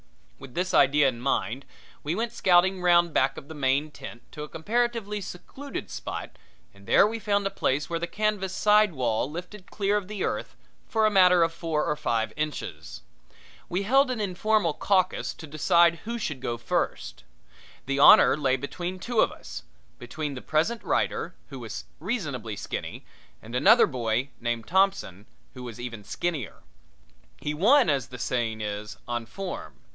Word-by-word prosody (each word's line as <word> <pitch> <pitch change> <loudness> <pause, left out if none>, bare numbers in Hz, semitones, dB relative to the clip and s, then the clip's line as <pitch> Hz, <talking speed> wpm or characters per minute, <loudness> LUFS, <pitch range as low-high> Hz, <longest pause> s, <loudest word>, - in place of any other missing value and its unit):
With 135 -2 -12
this 180 +1 -1
idea 145 +1 +5
in 120 -3 -2
mind 130 0 -1 0.4
we 155 +4 -2
went 230 +2 -2
scouting 185 -3 +3
round 175 -2 +4
back 135 +1 +2
of - - -9
the 160 - -8
main 145 +1 0
tent 120 -3 -10
to 150 - -8
a 150 - -6
comparatively 220 +2 -1
secluded 265 +10 -8
spot, - - -6 0.4
and 100 0 -18
there - - +6
we 225 +2 -2
found 205 -2 0
a 195 - 0
place 145 -6 0
where 170 -1 -2
the 170 - -3
canvas 210 -2 -1
side 210 0 +4
wall 125 -2 0
lifted 180 +5 -9
clear 205 0 0
of 200 -3 -4
the 210 -2 -4
earth - - -3 0.3
for 220 -2 +2
a 215 - +3
matter 180 -3 +6
of 165 0 0
four 165 -2 -1
or 150 - 0
five 115 -6 -1
inches. 150 - -5 0.7
We 185 +3 -1
held 270 +6 +4
an 250 -3 -2
informal 205 -2 +1
caucus 185 +1 0
to 160 - -10
decide 170 +3 +3
who 235 +1 -3
should 155 - -3
should - - -20
go 120 -1 -2
first. - - -3 0.6
The 140 +1 -1
honor 140 - +8
lay 135 -3 +1
between 175 +7 -5
two 235 +4 -2
of - - +4
us 65 - -9 0.4
between 145 +4 -5
the 125 - -7
present 170 +10 0
writer, 175 - -1
who 135 -2 -8
was 115 -3 -7
reasonably 145 - -3
skinny, 100 - -6 0.4
and 115 +2 -11
another 215 - +6
boy, 125 -1 -2
named 120 -1 -2
Thompson, 190 - +1 0.3
who 125 - -10
was 120 -2 -8
even 115 -3 -6
skinnier. 150 - -4 0.8
He 150 - -3
won, 215 - +5
as 135 -4 -1
the 125 - -9
saying 115 -3 -2
is, 105 0 -5
on 120 -1 -3
form. 195 +6 -6
160 Hz, 175 wpm, -26 LUFS, 125-195 Hz, 0.8 s, honor